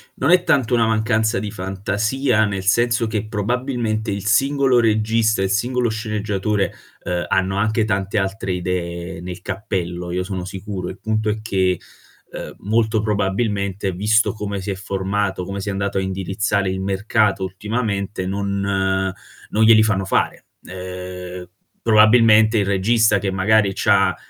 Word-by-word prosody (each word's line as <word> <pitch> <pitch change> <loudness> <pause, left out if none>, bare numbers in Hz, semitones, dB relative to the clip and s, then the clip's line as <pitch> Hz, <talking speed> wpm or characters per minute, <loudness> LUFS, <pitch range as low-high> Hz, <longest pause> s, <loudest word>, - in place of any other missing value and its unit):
non 140 +6 +1
è 180 -1 +5
tanto 135 -8 +2
una 115 -2 +3
mancanza 110 0 +1
di 105 -2 -4
fantasia, 105 +5 0
nel 100 -2 -3
senso 115 +4 +2
che 110 -1 -3
probabilmente 115 0 -2
il 100 0 -4
singolo 135 +3 +3
regista 110 -1 +2
e - - +2
il 95 - -1
singolo 120 +3 +1
sceneggiatore, 105 -2 -1 0.3
ehm, 90 -2 -2
hanno 95 +1 0
anche 110 +2 +1
tante 100 0 -1
altre 95 -1 -1
idee 85 -1 -4
nel 90 +2 -7
cappello, 90 -4 -4
io 90 +1 -1
sono 95 -1 -4
sicuro. 95 -1 -5
Il 95 - -9
punto 110 -1 -1
è 110 +1 -2
che, 95 -4 0 0.5
ehm, - - -7
molto 110 +1 +1
probabilmente, 100 -1 -1
visto 105 +6 +2
come 100 -2 -4
si 100 +2 -3
è - - -3
formato, 95 0 -2
come 100 +1 -5
si 100 - -4
è - - 0
andato 100 0 -2
a - - +2
indirizzare 95 +1 -1
il 95 0 -3
mercato 100 +1 +1
ultimamente, 100 0 -3
non 95 -1 -1 0.4
non 110 - +2
glieli 110 -1 +7
fanno 95 -3 0
fare. - - 0 0.2
Ehm, 90 0 -7 0.3
probabilmente, 110 0 +5
il 100 - +2
regista 105 +2 +3
che 100 - -2
magari 100 +2 +3
c'ha, 100 -2 +3
100 Hz, 155 wpm, -20 LUFS, 95-110 Hz, 0.5 s, glieli